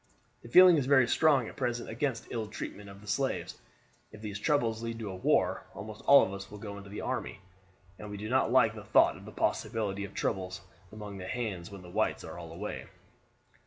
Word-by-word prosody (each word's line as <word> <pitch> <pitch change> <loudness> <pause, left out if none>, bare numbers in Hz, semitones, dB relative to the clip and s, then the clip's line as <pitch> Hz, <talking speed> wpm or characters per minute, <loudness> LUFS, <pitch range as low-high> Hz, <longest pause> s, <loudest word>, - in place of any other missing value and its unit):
The 115 - -12
feeling 180 +4 +8
is 135 -3 0
very 130 -3 +5
strong 140 -4 +3
at - - -9
present 120 -3 -2
against 120 0 -2
ill 110 -2 -3
treatment 105 -1 -7
of 100 0 -12
the 105 - -15
slaves. 135 +6 -2 0.5
If 110 - -12
these 105 -2 -5
troubles 115 -3 +1
lead 115 0 -4
to 105 -4 -5
war 95 - +1
almost 110 0 -8
all 140 - +9
of 95 - -3
us 100 0 -7
will 105 - -9
go 100 -1 -7
into 100 0 -11
the 105 - -6
army, - - -3 0.6
and 105 - -8
we 105 - -6
do 105 +2 -5
not 130 0 +2
like 120 -3 +5
the 110 -2 -9
thought 105 - +4
of - - -12
the - - -9
possibility 105 -3 -1
of 100 - -8
troubles 95 -1 -2 0.3
among 105 -2 -8
the 90 - -6
hands 105 -8 -3
when 100 -2 -10
the 90 - -11
whites 110 +3 0
are 80 +2 -8
all 85 -2 -9
away." 95 +6 -6
105 Hz, 215 wpm, -30 LUFS, 100-120 Hz, 0.6 s, all